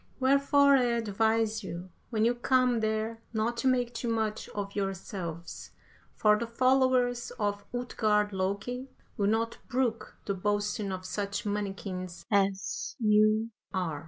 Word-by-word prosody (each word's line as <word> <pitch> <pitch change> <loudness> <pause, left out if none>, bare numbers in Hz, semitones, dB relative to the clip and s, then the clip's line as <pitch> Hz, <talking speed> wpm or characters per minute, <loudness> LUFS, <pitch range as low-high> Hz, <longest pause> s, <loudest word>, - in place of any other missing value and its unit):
Wherefore 280 +1 +5
I 250 - +3
advise 225 -1 +1
you, 180 0 -7 0.2
when 220 -2 +1
you 240 - +4
come 250 0 +2
there, 220 +1 -1
not 225 +2 0
to 265 - 0
make 245 -2 +2
too 235 +1 -4
much 220 -2 -1
of 200 -1 -5
yourselves, 190 -4 -4 0.5
for 210 0 +4
the 235 - -3
followers 255 0 +2
of 205 -2 -1
Utgard 215 -4 +1
Loki 200 +8 -2 0.3
will 200 -4 +1
not 225 +2 0
brook 235 -4 -1
the 200 - 0
boasting 205 +1 -1
of 185 0 -5
such 200 +2 -3
mannikins 195 -3 -4
as 195 -1 0
ye 215 0 +4 0.3
are. 165 -6 -1
215 Hz, 135 wpm, -29 LUFS, 200-240 Hz, 0.5 s, Wherefore